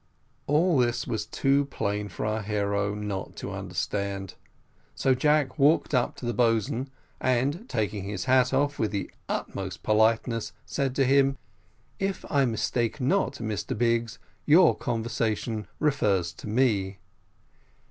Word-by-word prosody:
All 155 +1 +3
this 120 -1 +1
was 110 -1 -3
too 140 +1 +2
plain 105 -6 -3
for 85 - -5
our 110 +1 -1
hero 100 -1 -1
not 105 -2 -4
to - - -6
understand, 100 -2 -3 0.6
so 135 - +2
Jack 150 +2 +1
walked 150 +2 +3
up 125 -2 +1
to - - -8
the 120 - -1
boatswain, 115 +2 +1 0.3
and 135 - 0
taking 105 -3 -2
his 100 -2 -4
hat 130 -1 +4
off, 140 +1 +1
with 110 - +1
the 100 -2 -4 0.2
utmost 95 -1 -4
politeness, 110 +1 +2
said 135 -2 -2
to 135 - +3
him: 135 +1 +3 0.6
"If 195 0 -2
I 140 -2 +4
mistake 120 +2 -1
not, 145 +6 +1
Mr 110 -7 -4
Biggs, 115 -1 +1 0.3
your 165 +3 +6
conversation 115 -3 -2
refers 100 - +1
to - - -10
me." 105 -5 +1
115 Hz, 135 wpm, -27 LUFS, 105-135 Hz, 0.6 s, your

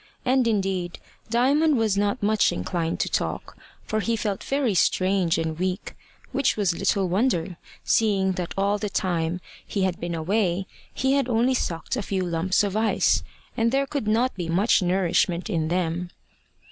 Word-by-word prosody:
And 255 -1 +3
indeed 190 -5 -1 0.3
Diamond 275 +6 +3
was 220 -3 +1
not 205 +3 0
much 215 0 +3
inclined 170 -2 -2
to - - 0
talk, - - -3 0.3
for 215 - -2
he 230 +2 0
felt 210 -3 -3
very 275 -5 0
strange 185 -1 +2
and 160 0 -3
weak, 185 0 -3 0.4
which 270 -2 +1
was 195 -5 +1
little 195 +2 +1
wonder, 180 -3 0 0.3
seeing 200 -4 +2
that 180 -2 -4
all 200 +1 +1
the 210 - -2
time 175 -2 -1 0.2
he 195 - -2
had 185 -2 -1
been 175 0 -3
away 185 +2 0 0.3
he 265 +1 0
had 275 -3 +1
only 240 +3 +2
sucked 165 -9 -2
a - - -1
few 195 -2 -2
lumps 175 +3 +1
of 200 -1 -2
ice, 220 0 +2 0.3
and 230 0 +1
there 275 +1 +2
could 275 -5 -4
not 235 +4 +2
be 175 -3 -5
much 195 +6 +3
nourishment 180 -1 +1
in 160 -2 0
them. 175 0 -1
195 Hz, 170 wpm, -25 LUFS, 175-225 Hz, 0.4 s, And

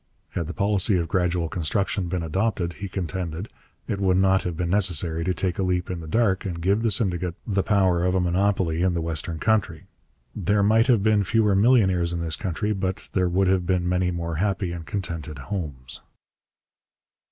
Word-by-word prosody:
Had 85 -3 -3
the 85 - -5
policy 100 0 +2
of 85 -2 -1
gradual 90 -2 0
construction 95 +2 -1
been 90 -1 -2
adopted, 95 0 -1
he 100 -1 -5
contended, 90 0 -4 0.4
it 100 - -2
would 95 -2 +2
not 95 0 +3
have 85 -3 -4
been 85 -1 -1
necessary 90 -4 +1
to 90 - 0
take 90 +1 -2
a - - +2
leap 90 -1 -1
in 90 - -4
the 80 - -8
dark 100 0 +1
and 90 -4 -4
give 100 +5 +1
the 115 - +1
syndicate 90 -5 0
the 100 -3 0
power 95 -4 +2
of 90 +1 +1
a - - +3
monopoly 90 -2 +1
in 90 -1 +2
the - - 0
western 80 0 -2
country: 100 -5 0 0.5
'there 100 +1 +1
might 110 +3 +4
have 115 -6 +3
been 105 -1 +3
fewer 105 0 +2
millionaires 95 -5 +3
in 85 - -2
this 80 -2 -2
country, 105 +4 -2
but 95 -2 -4
there 90 -2 +2
would 95 +2 +2
have 90 -2 +1
been 90 -1 +1
many 90 0 +1
more 85 -2 -3
happy 95 -1 -1
and 85 -2 -7
contented 85 -6 -4
homes.' 70 -5 -6
90 Hz, 195 wpm, -24 LUFS, 85-100 Hz, 0.5 s, might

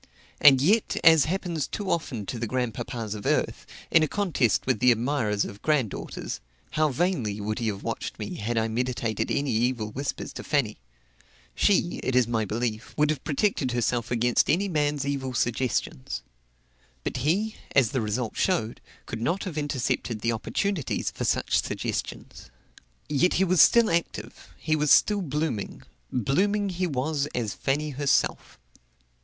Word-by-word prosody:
And 135 -3 +7
yet, 210 +7 +2
as 160 -3 +7
happens 170 -4 -2
too 200 -3 -3
often 140 -11 -2
to 120 - -5
the 115 - -2
grandpapas 115 -2 -3
of 105 -1 -5
earth, - - 0 0.2
in 160 - +6
a 155 - +3
contest 155 - +1
with - - +1
the 125 0 +5
admirers 115 -3 0
of 100 - -9
granddaughters, 140 -9 -2 0.3
how 155 0 +2
vainly 135 - -1
would 105 +1 -3
he 115 - -1
have 100 -2 -3
watched - - -4
me - - -5
had 115 +3 -3
I 110 0 +2
meditated 120 -1 -2
any 140 -1 0
evil 115 -1 0
whispers 135 +4 -4
to - - -7
Fanny! 135 -8 0 0.7
She, 180 - +2
it 130 - -1
is 125 -2 +4
my 115 -2 0
belief, 110 +2 -3
would 150 0 +3
have 150 - -4
protected 145 - 0
herself 120 0 0
against 120 0 +2
any 195 +5 +2
man's 150 -5 0
evil 135 -2 -2
suggestions. 120 - -1 0.8
But - - -3
he, 190 - 0 0.2
as 130 -6 +4
the 130 - 0
result 110 +2 -2
showed, 120 - 0 0.2
could 115 -2 -6
not 170 +11 0
have 185 -6 -5
intercepted 130 -6 -2
the 115 - +1
opportunities 155 - -1
for - - -4
such - - +2
suggestions. - - -5 0.6
Yet 150 +5 +2
he 190 - +3
was 185 -3 +4
still 235 +3 +6
active; 120 -9 -3
he 155 0 0
was 150 -1 +1
still 205 +6 +5
blooming. 150 - -3 0.3
Blooming 200 - +1
he 180 0 -1
was 145 0 -1
as 110 -4 -1
Fanny 150 +2 -1
herself. 140 0 0
135 Hz, 160 wpm, -26 LUFS, 115-160 Hz, 0.8 s, And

